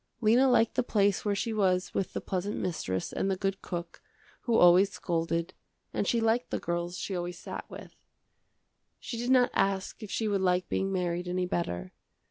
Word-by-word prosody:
Lena 240 +4 +4
liked 235 -2 +3
the - - +2
place 205 -5 +1
where 205 -1 0
she 225 +3 -2
was 185 -3 +1
with 195 - -2
the - - -3
pleasant 190 +2 -3
mistress 95 - -3
and 195 - 0
the 190 - 0
good 195 0 -2
cook, 170 -2 -6 0.4
who 235 -2 +2
always 180 +3 +7
scolded, 170 -1 -2 0.4
and 200 - -1
she 235 - +2
liked 225 +2 +1
the - - -1
girls 175 +1 -3
she 195 - -4
always 175 -1 -4
sat - - -7
with. - - -10 1.1
She 235 - -6
did 240 +2 -2
not 255 -1 +5
ask 195 -1 0
if 215 - -7
she 220 - -1
would 200 -2 +1
like 180 -1 +2
being 195 0 -1
married 180 -1 -1
any 180 0 0
better. 90 - -3
190 Hz, 190 wpm, -29 LUFS, 175-215 Hz, 1.1 s, always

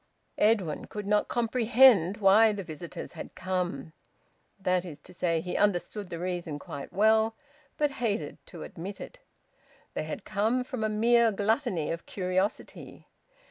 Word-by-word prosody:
Edwin 205 -8 +2
could 210 -1 -7
not 210 0 +2
comprehend 230 -4 +4
why 215 +2 +5
the 200 -1 -5
visitors 155 -2 -8
had - - -9
come. 175 -5 -3 0.7
That 185 -2 +1
is 160 -5 -9
to 180 - -13
say, 170 -2 0
he 180 +1 -5
understood 205 0 0
the 170 - -5
reason 175 -3 -3
quite 140 -1 -8
well, 220 +2 +3 0.4
but 295 -1 +1
hated 205 -11 -2
to 170 - -9
admit 195 +4 -8
it. - - -10 0.7
They - - -3
had - - -6
come 220 +5 0
from 250 -3 -5
a 215 - +1
mere 230 +2 +4
gluttony 205 - 0
of 165 0 -6
curiosity. 185 +1 -3
200 Hz, 145 wpm, -28 LUFS, 175-220 Hz, 0.7 s, why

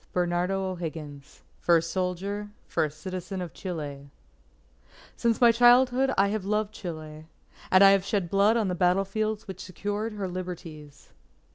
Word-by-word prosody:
AUGUST - - -33
20 180 -1 +2
BERNARDO 180 +3 -1
O'HIGGINS 155 -5 -8 0.2
FIRST 165 -1 +2
SOLDIER, 195 +3 -3 0.2
FIRST 155 0 -2
CITIZEN 185 +2 -5
OF 175 -3 -6
CHILE 145 -6 -6 1.1
_Since 230 -1 +1
my 240 -1 +7
childhood 245 +2 +5
I 200 +1 +4
have 210 -1 -2
loved 210 +1 -1
Chile; 155 -5 -8 0.4
and 185 +1 +6
I 195 - +9
have 195 -1 +3
shed 200 0 0
my 170 - -9
blood 200 +4 +3
on 220 -3 +1
the 180 - -1
battle 180 +2 +2
fields 215 +2 -2
which 190 -2 -7
secured 205 +4 -4
her 200 -2 -4
liberties. 165 -5 -8
185 Hz, 160 wpm, -27 LUFS, 170-205 Hz, 1.1 s, I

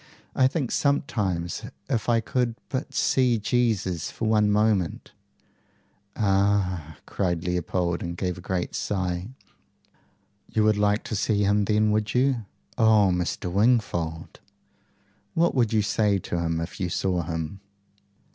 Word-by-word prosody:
"I 130 - +5
think 135 -2 -2
sometimes, 100 - 0 0.3
if 120 -4 -1
I 115 -1 +3
could 120 -1 -1
but 135 -2 -3
see 125 -3 +2
Jesus 105 -7 0
for 115 - -3
one 105 -1 +3
moment 105 -4 +1 0.6
" 100 +1 -40
"Ah!" 95 -6 +1
cried 85 -4 -1
Leopold, 90 -1 -1
and 85 0 -5
gave 90 -1 -2
a 90 - -10
great 90 0 -3
sigh. 90 -2 -2 1.2
"YOU 110 - +1
would 105 -1 +3
like 105 +1 +2
to 110 - -4
see 105 0 +1
him 100 +1 +2
then, 105 +1 +2
would 105 +1 0
you?" 125 -3 +2 0.3
"Oh, 110 -4 +5
Mr. 90 0 -2
Wingfold!" 90 -7 0 1.0
"What 170 +1 +3
would 120 -5 +2
you 110 -2 +2
say 105 -1 +2
to 85 -2 -3
him 85 -1 -1
if 85 +2 -6
you 90 -2 -1
saw 90 0 0
him?" 80 +3 -4
100 Hz, 140 wpm, -25 LUFS, 90-110 Hz, 1.2 s, I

